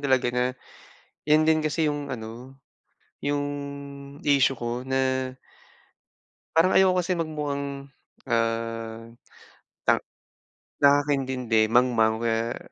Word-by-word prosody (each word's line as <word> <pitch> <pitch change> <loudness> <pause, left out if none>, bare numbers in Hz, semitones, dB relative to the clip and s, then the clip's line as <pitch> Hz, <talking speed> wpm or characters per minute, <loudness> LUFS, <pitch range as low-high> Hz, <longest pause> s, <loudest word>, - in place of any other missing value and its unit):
talaga 130 -3 +2
na 125 0 +1 0.8
'yan 155 +1 +5
din 160 0 +4
kasi 155 +1 0
'yong 145 -1 -2
ano, 125 +2 -8 0.7
'yong 145 0 0 0.8
issue 135 -2 +3
ko 120 +1 -3
na 130 -1 0 1.2
parang 170 +3 +5
ayoko 190 -1 +5
kasi 180 - -3
magmukhang, 140 -3 -4 0.4
ah, 115 0 -2 0.7
ta - - +3 0.8
nakakaintindi, 130 -6 +3
mangmang, 115 -2 +3
o - - -8
kaya 115 +1 0
130 Hz, 100 wpm, -26 LUFS, 115-145 Hz, 1.2 s, yan